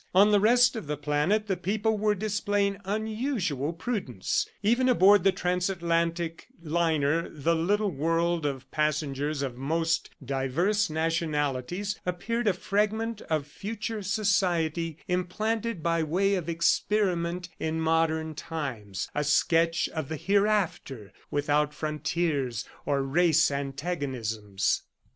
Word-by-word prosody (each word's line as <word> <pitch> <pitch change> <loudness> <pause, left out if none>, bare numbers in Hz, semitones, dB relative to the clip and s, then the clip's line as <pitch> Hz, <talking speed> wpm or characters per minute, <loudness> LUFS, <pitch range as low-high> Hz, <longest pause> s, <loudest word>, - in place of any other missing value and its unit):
On 205 +3 +7
the 205 - +5
rest 245 +4 +5
of 220 -9 -5
the 150 0 -2
planet, 150 +9 +1
the 195 -3 0
people 215 +4 0
were 210 0 +1
displaying 205 -1 0
unusual 215 - -1
prudence. 165 - -2
Even 240 +5 +3
aboard 205 -5 +6
the 195 - +5
transatlantic 170 -2 -1
liner, 160 -1 +1
the 160 +2 0
little 200 +5 +1
world 165 +3 0
of 140 -3 -4
passengers 150 -1 -1
of 130 -3 -3
most 165 +4 0 0.2
diverse 160 - +1
nationalities 160 +3 -1
appeared 215 +6 -2
a 200 - +4
fragment 215 +4 -1
of 155 -3 0
future 215 +6 -5
society 175 -6 0
implanted 210 +2 -1
by 165 -1 +1
way 185 +6 +1
of 175 -4 -2
experiment 175 0 +1
in 160 0 -1
modern 160 -1 +1
times 125 - -5
a 150 - 0
sketch 165 +3 +2
of 155 -4 -4
the 160 - -3
hereafter, 195 - 0 0.2
without 145 +1 +1
frontiers 150 -5 -1 0.2
or 140 -1 +1
race 160 +2 +3
antagonisms. 135 - -2
170 Hz, 120 wpm, -28 LUFS, 150-200 Hz, 0.2 s, On